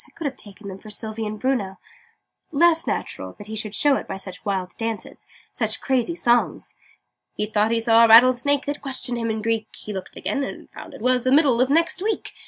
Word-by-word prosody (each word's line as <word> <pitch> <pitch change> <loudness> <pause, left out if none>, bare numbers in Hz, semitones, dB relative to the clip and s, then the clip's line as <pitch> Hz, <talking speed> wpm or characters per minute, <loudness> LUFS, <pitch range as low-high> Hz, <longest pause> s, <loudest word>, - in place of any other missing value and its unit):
I - - -23
could 330 - -6
have 275 - -2
taken 205 0 -11
them 195 -1 -7
for 215 - -12
Sylvie 220 +1 -4
and 210 0 -6
Bruno 210 -7 -1 0.7
less 330 +2 +3
natural - - -4
that 205 - -12
he 220 +1 -7
should 215 -1 -4
show 290 -2 +3
it - - -7
by - - -5
such 190 -1 -8
wild 190 -3 -3
dances, 225 -1 -5 0.3
such - - -1
crazy 265 +5 0
songs! 240 -6 +1 0.6
"He 210 - -1
thought 210 0 +1
he 230 0 +1
saw 230 0 +5
a - - +4
Rattlesnake 255 +5 +6
That 290 +1 -4
questioned 250 -3 -2
him 230 -1 -2
in 220 -1 -3
Greek: 225 -1 0
He 210 - -7
looked 190 -2 -7
again, 280 - -2
and - - -8
found - - -11
it - - -12
was 250 0 +2
The 255 - +1
Middle 270 -4 +5
of 255 - +2
Next 330 +5 +2
Week. 435 +2 -2
230 Hz, 220 wpm, -23 LUFS, 215-270 Hz, 0.7 s, Rattlesnake